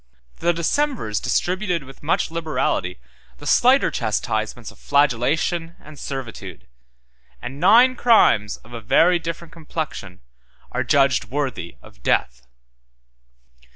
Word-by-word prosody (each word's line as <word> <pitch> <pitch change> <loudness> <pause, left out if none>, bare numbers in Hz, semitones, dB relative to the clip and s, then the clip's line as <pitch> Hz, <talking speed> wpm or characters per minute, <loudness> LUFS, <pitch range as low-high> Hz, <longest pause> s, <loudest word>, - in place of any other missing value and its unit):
The 175 - +2
decemvirs 170 - -1
distributed 180 -3 -1
with 135 0 -14
much 155 +1 0
liberality 150 - -2 0.4
the - - -13
slighter - - +4
chastisements - - -2
of - - -21
flagellation 145 - +1
and 150 -1 -14
servitude; 110 - -7 0.7
and 135 - -8
nine 235 +9 +6
crimes 215 - +3
of 120 - -15
a 115 - -6
very 175 +10 +4
different 165 0 -7
complexion 155 - -6 0.5
are - - -1
adjudged 135 -3 +2
worthy 130 -8 -4
of - - -17
death. 60 +1 -1
145 Hz, 115 wpm, -22 LUFS, 115-170 Hz, 0.7 s, nine